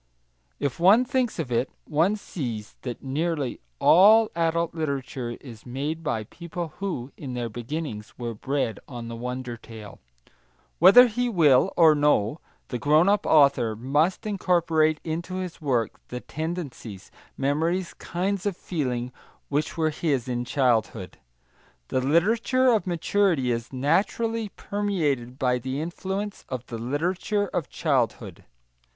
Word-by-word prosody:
If 140 0 -2
one 205 +8 +6
thinks 255 -3 0
of 150 -7 -4
it, 120 +3 +1 0.2
one 165 +7 +2
sees 120 - -6
that 125 -3 -6
nearly 145 0 -2 0.2
all 215 - +6
adult 170 0 0
literature 135 -6 -3
is 115 -6 -12
made 145 +6 -4
by 150 -9 -2
people 170 - -7
who, 165 -10 -4
in 130 -4 -6
their 120 -1 -3
beginnings, 120 -1 -6
were 120 -2 -4
bred 125 -1 -2
on 120 -3 -7
the 115 - -6
wonder 125 0 -5
tale. 110 -3 -11 0.8
Whether 245 +5 +9
he 245 +1 -1
will 160 - +4
or 160 -2 +7
no, 145 -3 +2 0.3
the 125 - -3
grown 155 - +4
up 205 0 +2
author 140 -7 +4
must 145 - 0
incorporate 165 -6 +2
into 170 +3 -4
his 185 -3 -5
work 125 -6 -1
the 125 - -5
tendencies, 155 - -6 0.3
memories, 165 +6 0
kinds 195 +3 -2
of 195 -3 -2
feeling 125 -7 -3 0.4
which 150 +3 -1
were 160 -1 +1
his 145 -5 -1
in 120 -1 -2
childhood. 120 -8 0 0.7
The 130 - 0
literature 225 - +3
of 215 -4 0
maturity 170 -5 +1
is, 115 0 -3
naturally, 210 - 0
permeated 160 - -2
by 125 -2 +1
the 130 +3 -4
influence 190 +5 -4
of 125 -2 -4
the 115 - -6
literature 180 - -1
of 170 -7 -3
childhood. 120 - -1
150 Hz, 135 wpm, -25 LUFS, 125-180 Hz, 0.8 s, Whether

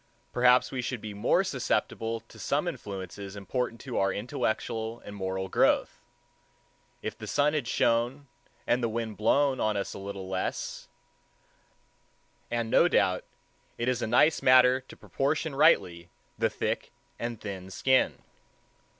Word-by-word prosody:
Perhaps 125 +1 +4
we 130 - -2
should 125 0 -3
be 105 -1 -7
more 100 - +2
susceptible 115 0 -1
to 115 - -17
some 145 +5 0
influences 100 - -6
important 115 +4 -3
to 130 -3 -3
our 95 0 +2
intellectual 110 +1 -2
and 105 - -8
moral 95 -1 -3
growth, - - +2 1.0
if - - -3
the - - -9
sun 145 +1 +2
had 145 -6 -1
shone 120 +6 +1 0.4
and 125 - +2
the 115 - 0
wind 110 -1 -3
blown 135 +5 +2
on 110 -1 +1
us 100 - -3
a - - -8
little 100 -1 -6
less; 95 0 -3 1.6
and 115 -1 -2
no 175 - +6
doubt 95 - +2 0.5
it 120 - -2
is 125 -2 +1
a - - -1
nice 125 +7 +4
matter 130 0 +6
to - - -12
proportion 150 +2 -1
rightly 90 - +3 0.3
the - - +1
thick - - -3 0.3
and 120 -1 -4
thin 95 -3 -7
skin. 130 +6 +1
115 Hz, 145 wpm, -28 LUFS, 100-130 Hz, 1.6 s, no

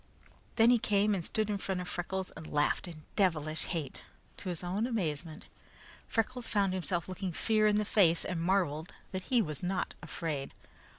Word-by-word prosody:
Then 230 +1 +6
he 245 - +5
came 210 0 +3
and 185 -4 -1
stood 215 +5 0
in 205 -1 -1
front 190 -1 -2
of 180 - -4
Freckles 185 +2 -3
and 160 - -10
laughed 150 +4 +1
in 155 -3 -9
devilish 160 -6 +1
hate. 160 -6 -3 0.4
To 190 - -5
his 175 -1 -3
own 195 +6 0
amazement, 165 - -2 0.6
Freckles 245 +2 -1
found 200 -3 +2
himself 175 -2 -1
looking 185 0 -3
fear 215 +4 +3
in 210 0 +4
the 210 - +1
face, 175 -6 +4
and 175 -3 -2
marveled 170 -3 0 0.2
that 185 -1 -4
he 245 -3 +4
was 150 -5 -5
not 180 +1 -1
afraid. 160 -4 -4
185 Hz, 180 wpm, -32 LUFS, 165-205 Hz, 0.6 s, Then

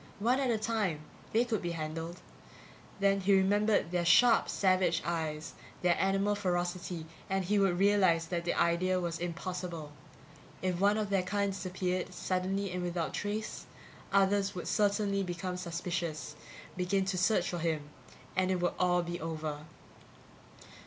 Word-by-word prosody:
One 240 +6 +2
at 265 -2 +1
a 230 - +2
time, 215 -8 -1 0.3
they 230 +2 +3
could 225 -4 -1
be 175 -2 -2
handled. 165 +2 -5 0.8
Then 200 0 +3
he'd 195 +1 +3
remember 205 +2 +3
their 175 +1 -1
sharp 230 +7 +5
savage 185 -3 +2
eyes, 160 -2 -3 0.3
their 175 -1 +4
animal 195 +1 +2
ferocity, 175 -3 -2 0.2
and 190 -1 0
he 205 +3 +2
would 190 -3 +3
realize 190 -4 +4
that 170 -1 -1
the 175 - -1
idea 185 +2 +2
was 170 -2 -3
impossible. 170 -2 -4 0.7
If 180 -2 0
one 205 +2 +4
of 210 -2 -2
their 195 -1 +3
kind 200 +2 0
disappeared, 185 -1 -3
suddenly 190 +2 -1
and 180 0 -3
without 175 -2 -2
trace, 210 +1 -4 0.4
others 200 0 +3
would 180 - -5
certainly 200 -1 +1
become 180 0 -3
suspicious, 170 -3 -4 0.4
begin 190 +1 +1
to 190 -1 -1
search 185 -1 +2
for 175 - -3
him 160 -3 -1 0.5
and 185 0 +2
it 185 -1 +1
would 175 0 +1
all 180 -1 +3
be 175 0 -5
over. 155 -2 -4
185 Hz, 150 wpm, -31 LUFS, 170-200 Hz, 0.8 s, sharp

